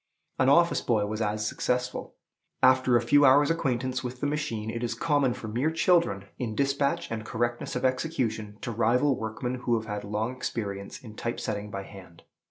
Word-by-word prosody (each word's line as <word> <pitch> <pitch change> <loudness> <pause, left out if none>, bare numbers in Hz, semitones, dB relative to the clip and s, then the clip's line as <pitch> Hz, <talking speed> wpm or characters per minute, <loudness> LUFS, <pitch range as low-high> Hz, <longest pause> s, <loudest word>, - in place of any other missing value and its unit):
An 130 - +4
office 170 +4 +4
boy 110 -4 +1
was 110 +2 -3
as 105 0 -1
successful. 125 +3 -2 0.5
After 130 -1 +5
a 120 - -1
few 145 +5 +5
hours' 145 +3 +6
acquaintance 130 -5 -1
with 125 0 -5
the - - -2
machine, 145 -8 -2
it 115 +1 -4
is 120 - -1
common 145 -6 +1
for 110 - -7
mere 120 +8 0
children, 165 - +2
in 115 -4 -3
dispatch 140 +4 0
and 110 -1 -3
correctness 120 +2 -2
of - - -1
execution, 115 -6 -1
to 120 - -3
rival 120 +5 +2
workmen 125 +3 -4
who 120 - +2
have 110 - -9
had 105 -1 -4
long 110 +4 -2
experience 100 -6 -4
in 110 -3 -10
type 115 +2 -3
setting 105 -1 -3
by 100 -1 -5
hand. 95 -4 -13
120 Hz, 185 wpm, -27 LUFS, 110-135 Hz, 0.5 s, hours